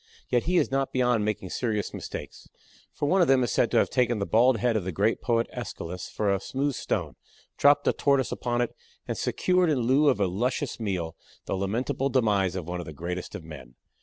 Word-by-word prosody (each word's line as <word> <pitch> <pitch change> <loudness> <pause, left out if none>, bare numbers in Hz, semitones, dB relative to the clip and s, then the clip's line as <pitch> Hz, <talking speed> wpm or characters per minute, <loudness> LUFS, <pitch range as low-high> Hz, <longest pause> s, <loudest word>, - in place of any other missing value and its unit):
Yet 120 -1 +1
he 180 +2 +2
is - - +2
not 135 0 0
beyond 125 -4 +2
making 105 -3 -3
serious 110 -4 -2
mistakes, - - -8 0.4
for - - -3
one 190 +5 +3
of 175 - +4
them 135 -1 +4
is 120 - -1
said - - +2
to - - +1
have - - +3
taken 125 -2 +2
the 100 - -1
bald 120 +4 +4
head 120 +1 +1
of 110 - 0
the 95 - -3
great 105 +6 +1
poet 115 -1 +1
Aeschylus 85 +2 -6
for 100 -2 0
a 100 - 0
smooth 140 +7 -2
stone, - - -3 0.4
dropped 145 0 +4
a - - +4
Tortoise 140 -2 +1
upon 120 0 -1
it, 120 - -2 0.3
and - - -2
secured 180 -2 +1
in 140 -5 +1
lieu 135 +5 +4
of 130 - +1
a 100 - +3
luscious 120 +9 -2
meal 90 -7 -3 0.3
the - - -3
lamentable 115 +8 -1
demise 105 -8 +2
of 90 -4 -4
one 90 0 -3
of 90 - -7
the 80 - -7
greatest 90 +4 -5
of 85 - -7
men. 70 -6 -11
115 Hz, 220 wpm, -27 LUFS, 95-130 Hz, 0.4 s, of